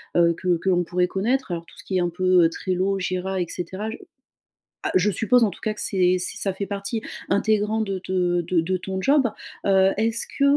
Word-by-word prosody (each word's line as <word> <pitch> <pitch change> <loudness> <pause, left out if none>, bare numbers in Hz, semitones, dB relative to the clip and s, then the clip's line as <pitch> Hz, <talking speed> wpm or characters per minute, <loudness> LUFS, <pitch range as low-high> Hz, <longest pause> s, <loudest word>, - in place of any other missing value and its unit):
heu, 170 -1 +5
que 180 +1 0
que 190 - -2
l'on 180 -1 +3
pourrait 180 +1 +1
connaître. 230 +6 -1
Alors, 170 -1 -4
tout - - -18
ce - - -12
qui 190 - -2
est - - +3
un 175 - +1
peu, 180 0 +3
heu, 165 - +4
Trello, 185 +2 -1
Jira 185 0 -2
et 175 - 0
cetera. 190 +5 -5
Je 225 - -7 0.9
ah - - -1
je 185 +3 +3
suppose, 230 +5 +3
en 210 - +3
tout - - -12
cas 215 - -1
que 210 - -7
c'est 185 -2 +2
ç 180 - -2
ça 195 -2 0
fait 200 +1 -4
partie 200 +3 -3 0.3
intégrante 215 +1 +1
de 195 - -2
te 180 -1 0
de 170 0 +1
de 185 +3 -1
ton 190 +1 -4
job. 275 +5 +4 0.4
Heu, 190 -1 +5
est-ce 225 +1 0
que, 280 - -2
190 Hz, 235 wpm, -23 LUFS, 180-210 Hz, 0.9 s, heu